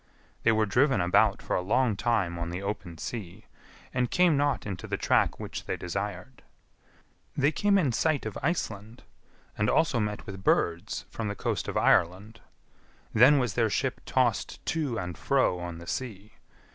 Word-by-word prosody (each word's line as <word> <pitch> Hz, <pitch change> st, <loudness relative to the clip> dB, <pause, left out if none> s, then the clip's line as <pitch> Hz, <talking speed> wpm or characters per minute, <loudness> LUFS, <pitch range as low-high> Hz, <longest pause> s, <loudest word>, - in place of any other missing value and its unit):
They 115 Hz, -, +4 dB
were 110 Hz, 0 st, +2 dB
driven 125 Hz, +3 st, +3 dB
about 90 Hz, 0 st, +3 dB
for -, -, -1 dB
a -, -, +1 dB
long 110 Hz, +4 st, +1 dB
time 100 Hz, -5 st, 0 dB
on 85 Hz, 0 st, -3 dB
the 90 Hz, +3 st, -5 dB
open 100 Hz, -4 st, -5 dB
sea, 105 Hz, +1 st, -7 dB, 0.5 s
and 125 Hz, -1 st, 0 dB
came 180 Hz, -3 st, +4 dB
not 145 Hz, 0 st, 0 dB
into 95 Hz, -4 st, -5 dB
the -, -, -2 dB
track -, -, +2 dB
which -, -, -6 dB
they -, -, -3 dB
desired. 100 Hz, +7 st, -5 dB, 1.0 s
They 140 Hz, +1 st, +3 dB
came 200 Hz, +5 st, +2 dB
in 155 Hz, -9 st, +2 dB
sight 145 Hz, +3 st, 0 dB
of 110 Hz, -, -4 dB
Iceland, 110 Hz, -, -3 dB, 0.5 s
and 105 Hz, -, +1 dB
also 160 Hz, -7 st, +2 dB
met 105 Hz, -1 st, -3 dB
with 95 Hz, -1 st, -8 dB
birds 85 Hz, -1 st, 0 dB
from 115 Hz, -, -4 dB
the 100 Hz, -, -3 dB
coast -, -, -2 dB
of -, -, -2 dB
Ireland. 100 Hz, +6 st, +2 dB, 0.7 s
Then 130 Hz, +6 st, +7 dB
was 125 Hz, -6 st, 0 dB
their 115 Hz, 0 st, +2 dB
ship -, -, -1 dB
tossed -, -, 0 dB
to 150 Hz, -8 st, -1 dB
and 90 Hz, -4 st, -4 dB
fro 130 Hz, -10 st, +2 dB
on 85 Hz, -1 st, -6 dB
the 85 Hz, -, -10 dB
sea. 105 Hz, -1 st, -5 dB
110 Hz, 170 wpm, -28 LUFS, 95-130 Hz, 1.0 s, Then